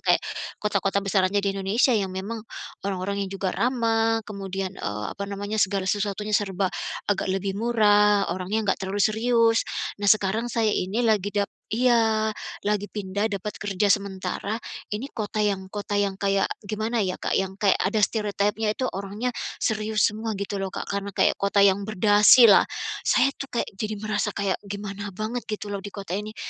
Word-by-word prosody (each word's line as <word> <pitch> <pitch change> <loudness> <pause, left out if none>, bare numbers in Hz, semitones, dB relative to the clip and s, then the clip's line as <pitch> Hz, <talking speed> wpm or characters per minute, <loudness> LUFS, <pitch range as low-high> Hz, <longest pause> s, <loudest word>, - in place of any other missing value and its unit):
kayak - - +2 0.3
kota-kota 200 -1 0
besarannya 195 0 +2
di 200 - +1
Indonesia 195 +6 +2
yang 200 -4 +1
memang, 215 +4 -4 0.5
orang-orang 195 +1 -2
yang - - -14
juga 190 -1 -1
ramah 225 -2 +1
kemudian, 195 -2 -4
eee, 105 0 -3
apa 200 0 -6
namanya, 205 +2 -3
segala 190 0 +1
sesuatunya 205 +1 -1
serba 195 -2 +1 0.3
agak 200 -2 0
lebih 195 +1 -1
murah, 210 -3 +4
orangnya 195 +3 0
enggak - - -5
terlalu 195 +1 0
serius. 230 +1 +3 0.4
Nah 205 - +1
sekarang 215 +3 +3
saya 225 -2 +1
ini 205 +7 0
lagi 210 -3 +2
dap 200 -1 0 0.2
iya, 225 -2 +3 0.3
lagi 205 0 0
pindah 205 +1 -2
dapat 205 +1 -4
kerja 205 0 0
sementara, 200 +1 -2 0.4
ini 225 +6 -2
kota 215 -2 -4
yang 195 -2 -1
kota 205 0 -4
yang 200 -1 0
kayak 195 -1 +1 0.2
gimana 220 +3 -2
ya 185 -1 -1
Kak, - - -3
yang 190 0 0
kayak 200 -2 +3
ada 205 +3 +1
stereotype-nya 210 0 0
itu 255 - -1
orangnya 200 +5 -3 0.3
serius 215 -1 +2
semua 220 +1 -4
gitu 200 0 -3
loh 195 -1 -3
Kak, - - -4
karena 200 0 -2
kayak - - +3
kota 200 0 +3
yang 200 0 +4
berdasi 210 +3 +7
lah. 195 - +6 0.4
Saya 275 - +4
tuh 275 - -6
kayak - - -4
jadi 215 +1 -2
merasa 215 -1 0
kayak 200 -2 -1
gimana 200 0 -5
banget 220 +5 -3
gitu 210 -1 -4
loh 200 - -2
di 205 - -7
kota 195 -3 -8
ini, 215 +1 -6
205 Hz, 170 wpm, -25 LUFS, 195-215 Hz, 0.5 s, berdasi